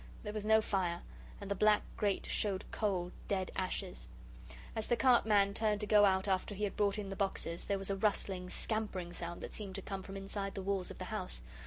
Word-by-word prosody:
There 210 -1 -4
was 215 -1 -3
no 220 0 +6
fire, 175 -4 0 0.4
and 200 -1 -6
the - - +5
black 210 +1 +4
grate 205 -3 0
showed 200 -2 0
cold, 185 -5 0 0.2
dead 190 -2 0
ashes. 65 - -3 0.7
As 220 - -2
the 240 - +3
cart 250 -3 +5
man 200 -2 +4
turned 215 -1 +1
to - - 0
go 210 0 +7
out 190 0 +3
after 190 +1 0
he 210 - -3
had 205 - -1
brought 200 -1 +2
in 205 -2 -4
the - - -3
boxes, 190 -4 -2
there 200 - +1
was 195 0 -2
a - - +1
rustling, 195 -2 0
scampering 195 -6 -2
sound 175 0 -5
that - - -6
seemed 195 -3 -5
to 195 - -3
come 195 -1 -4
from 195 +1 -7
inside 195 0 -4
the 195 - -3
walls 195 -1 -1
of - - -8
the - - -5
house. - - 0
195 Hz, 225 wpm, -35 LUFS, 190-210 Hz, 0.7 s, go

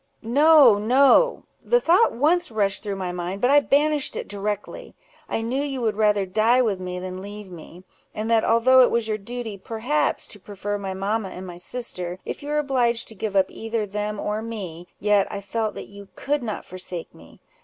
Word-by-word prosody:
"No, 275 -2 +6
no! 275 - +4 0.2
the 485 - +3
thought 385 +2 +4
once 320 +8 +1
rushed 205 -3 0
through 205 -2 -4
mind, 180 0 -4
but 250 +4 +2
I 290 - +7
banished 290 0 +1
it - - -5
directly. 205 - -5 0.3
I 225 - -2
knew 255 +4 -1
you 275 -2 -3
would 220 -3 0
rather 210 -2 +2
die 220 +6 +3
with 215 -7 +1
me 180 -1 -5
than 185 0 -6
leave 205 -1 -9
me; 175 +1 -12 0.3
and 215 +1 -4
that 225 -1 +3
although 255 +3 +5
it 250 - +5
was 235 -1 0
your 215 -1 -2
duty, 225 -1 -6
perhaps, 235 +9 -1
to 205 - -9
prefer 205 +1 -5
my 190 -1 -5
mamma 200 +1 -2
and 185 0 -8
my 175 -1 -9
sister, 180 -3 -5
if - - -5
you 290 - -7
were 300 - 0
obliged 245 -5 +1
to - - -9
give 210 -1 -4
up 190 -1 +3
either 225 -1 -3
them 210 +1 -4
or 210 +1 -2
me, 190 -7 -7
yet 205 -1 +2
I 200 - -4
felt 215 +2 -3
that - - -7
you 200 0 -12
could 290 +1 -1
not 220 -3 -5
forsake 180 -2 -7
me. - - -17
215 Hz, 200 wpm, -23 LUFS, 195-250 Hz, 0.3 s, I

